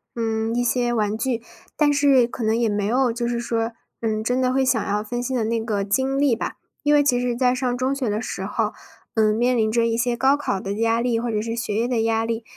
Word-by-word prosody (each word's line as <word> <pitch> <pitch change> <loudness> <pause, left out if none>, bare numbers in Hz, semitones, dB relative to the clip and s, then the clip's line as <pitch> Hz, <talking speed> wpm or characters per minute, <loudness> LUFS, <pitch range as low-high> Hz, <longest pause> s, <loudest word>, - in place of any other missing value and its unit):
嗯， 225 0 -1
一 245 - +1
些 245 0 +1
玩 215 -3 0
具， 235 0 -2 0.3
但 290 -1 +3
是 280 -3 +4
可 240 0 -6
能 220 +1 +2
也 235 -1 +2
没 205 -1 -1
有 245 +2 +2
就 235 0 -2
是 240 0 -1
说， 230 -1 -2 0.3
嗯， 220 -1 -1
真 250 +3 0
的 255 0 +2
会 265 +1 +2
想 245 -4 +2
要 210 +1 0
分 240 +3 -4
心 260 +1 -2
的 225 - 0
那 230 +1 0
个 210 -3 -1
精 265 +7 0
力 280 -4 +3
吧。 - - -4 0.3
因 295 0 +2
为 290 - +5
其 255 -4 +2
实 245 -1 -1
在 250 0 +2
上 250 -1 -1
中 260 +2 0
学 265 -5 -2
的 210 +1 -1
时 - - -5
候， - - -1 0.4
呃， 215 -1 +3
面 245 +3 +2
临 220 -2 +1
着 230 +1 +2
一 230 -1 +1
些 240 +1 0
高 265 +3 +4
考 290 -9 -2
的 195 +1 -4
压 230 +2 +1
力， 235 -1 +1
或 235 0 -2
者 215 - 0
是 230 +1 -3
学 230 -3 -3
业 230 +3 +1
的 240 -3 0
压 225 0 +1
力， 230 0 -3
235 Hz, 280 characters per minute, -23 LUFS, 225-255 Hz, 0.4 s, 为